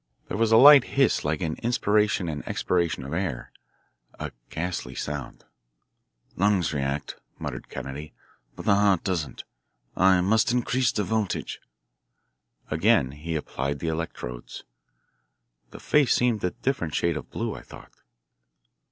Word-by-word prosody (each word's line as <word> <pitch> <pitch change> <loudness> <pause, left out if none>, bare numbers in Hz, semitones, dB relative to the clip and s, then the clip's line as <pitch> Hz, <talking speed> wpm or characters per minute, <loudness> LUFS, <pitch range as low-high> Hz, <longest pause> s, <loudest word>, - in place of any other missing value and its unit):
There - - -3
was 115 0 +2
a 110 - +7
light 140 +1 +9
hiss 135 -4 +3
like 75 0 -1
an 80 -2 -2
inspiration 105 -5 +1
and 75 -2 -4
expiration 85 -6 0
of 70 +3 -6
air, 80 -8 -3 0.7
a - - -4 0.2
ghastly 80 -6 -4
sound. 75 -3 -6 0.9
"Lungs 95 -4 +2
react," 70 0 -3 0.2
muttered - - -6
Kennedy, 70 +3 -7 0.4
"but - - -9
the 105 - +5
heart 100 -3 +3
doesn't. 85 -7 -3 0.5
I 95 0 +5
must 110 +5 +3
increase 125 0 +1
the 105 - -1
voltage." 105 0 -2 1.1
Again 80 - +3
he 80 +4 -5
applied 70 -2 -3
the 80 - -3
electrodes. 70 -7 -5 1.1
The - - -11
face 145 -3 +3
seemed 120 -4 +1
a 90 - +2
different 90 - -3
shade 85 -1 +1
of 75 - -6
blue, - - -3
I - - -9
thought. - - -14
90 Hz, 135 wpm, -26 LUFS, 75-110 Hz, 1.1 s, light